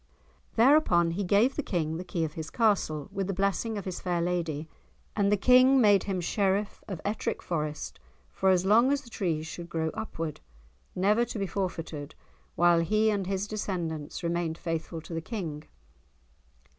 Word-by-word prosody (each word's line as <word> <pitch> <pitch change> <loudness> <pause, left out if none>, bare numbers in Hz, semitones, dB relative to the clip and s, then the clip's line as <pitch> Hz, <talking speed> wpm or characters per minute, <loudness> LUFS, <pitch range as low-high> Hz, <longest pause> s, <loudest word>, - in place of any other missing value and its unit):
Thereupon 225 - +5
he 195 +4 -2
gave 205 +8 +3
the - - 0
King 160 - -2
the 180 - -5
key 175 -2 -2
of 155 -1 -3
his 160 -1 -6
castle, 195 - +1
with 195 -1 -2
the 195 - -2
blessing 200 +3 0
of 200 - -5
his 185 -2 -4
fair 175 -2 -1
lady, 170 -3 -2 0.5
and 200 -1 +2
the 210 - +4
King 255 +5 +6
made 205 -4 +5
him 195 -2 -1
Sheriff 200 +3 0
of 190 -5 -5
Ettrick 205 +2 -2
Forest 155 -3 -3 0.3
for 190 - +1
as 185 -1 +3
long 230 +7 +5
as 285 0 +1
the 235 - -15
trees 165 -7 -1
should 170 +1 -8
grow 160 -1 -1
upward, 165 -8 -5 0.5
never 210 +5 +3
to 240 - -6
be 200 - -1
forfeited 165 -6 -4 0.4
while 175 -1 +5
he 215 +6 +2
and 200 -3 -1
his 195 0 -1
descendants 175 -8 -4
remained 170 -1 -1
faithful 165 -1 -4
to 165 - -9
the 165 - -2
King. 160 -7 -5
185 Hz, 175 wpm, -28 LUFS, 165-210 Hz, 0.5 s, King